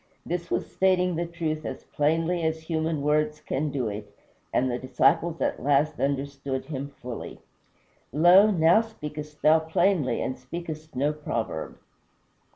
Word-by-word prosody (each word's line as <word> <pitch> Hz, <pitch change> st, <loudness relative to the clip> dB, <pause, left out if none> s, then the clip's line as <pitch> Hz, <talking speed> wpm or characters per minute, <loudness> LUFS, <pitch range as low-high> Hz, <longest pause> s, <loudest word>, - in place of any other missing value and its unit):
This 175 Hz, 0 st, -3 dB
was -, -, -2 dB
stating 180 Hz, -2 st, +2 dB
the 170 Hz, +1 st, -2 dB
truth 160 Hz, -2 st, -3 dB
as -, -, -6 dB
plainly 165 Hz, +4 st, 0 dB
as 160 Hz, 0 st, -1 dB
human 160 Hz, -2 st, -1 dB
words 150 Hz, +1 st, +1 dB
can 150 Hz, 0 st, -2 dB
do 135 Hz, -4 st, -2 dB
it, 105 Hz, 0 st, -6 dB, 0.4 s
and 130 Hz, -, +2 dB
the 120 Hz, -, -2 dB
disciples 140 Hz, +6 st, +2 dB
at -, -, 0 dB
last 145 Hz, +3 st, +2 dB
understood 140 Hz, -1 st, -2 dB
him 140 Hz, -2 st, -4 dB
fully. 125 Hz, -4 st, -8 dB, 0.7 s
"Lo! 175 Hz, -, +7 dB
now 175 Hz, +2 st, +5 dB
speakest 150 Hz, -9 st, -8 dB
thou 155 Hz, +1 st, +6 dB
plainly, 160 Hz, -5 st, +1 dB
and 130 Hz, -, -3 dB
speakest 155 Hz, +3 st, -7 dB
no 145 Hz, +4 st, +1 dB
proverb." 115 Hz, -, -4 dB
155 Hz, 145 wpm, -26 LUFS, 140-170 Hz, 0.7 s, Lo